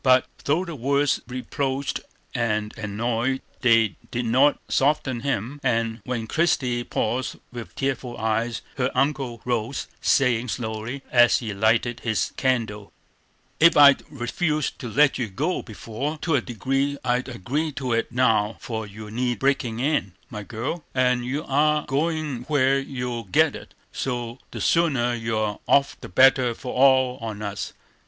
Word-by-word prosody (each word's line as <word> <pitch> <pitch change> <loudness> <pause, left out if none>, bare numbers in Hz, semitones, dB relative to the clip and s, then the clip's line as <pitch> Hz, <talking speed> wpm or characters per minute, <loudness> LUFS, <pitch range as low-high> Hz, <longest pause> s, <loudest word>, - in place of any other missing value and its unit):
But 130 -1 +5 0.2
though 160 +6 +1
the 170 - -6
words 140 +1 +1
reproached 130 +2 -2 0.3
and 110 -2 -1
annoyed, 115 +4 -1 0.2
they 115 -5 +3
did 120 0 -2
not 130 +6 +4
soften 135 -3 +1
him, 135 +1 -2
and 115 -3 0
when 120 -3 -2
Christie 125 -4 +1
paused 120 +2 -2 0.2
with 120 -2 -8
tearful 130 -3 -2
eyes, 115 +2 -1
her 130 -1 +1
uncle 135 -5 0
rose, 120 +1 -1 0.2
saying, 125 -3 +2
slowly, 115 +3 -4
as 120 -1 +6
he 110 -4 -4
lighted 115 +4 +1
his 110 -4 -1
candle: 110 -6 -1 0.7
"Ef 170 -1 +7
I'd 140 -1 +8
refused 150 +3 -2
to 125 -5 -5
let 145 +6 +3
you 120 - -1
go 150 - -1
before, 120 +7 -5 0.2
I'd 130 +1 0
agree 135 - -2
to 130 -3 -2
it 115 +1 0
now; 115 -4 +2
for 110 -2 -5
you 105 +1 -10
need 120 +1 -1
breakin' 125 -3 0
in, 130 - 0 0.2
my 105 - -5
girl, 115 - -4
and 125 -1 +2
you 135 +5 -2
are 150 +2 +2
goin' 150 -3 -1
where 135 -2 +3
you'll 125 -4 -4
get 90 - +3
it, - - -11 0.2
so 120 -1 -3
the - - -7
sooner 135 -8 +2
you're 110 -3 -2
off 140 0 +3
the - - -8
better 125 +3 +5
for 125 - -6
all 130 -1 +4
on 110 -2 -5
us. 100 -1 -4
125 Hz, 145 wpm, -24 LUFS, 115-135 Hz, 0.7 s, I'd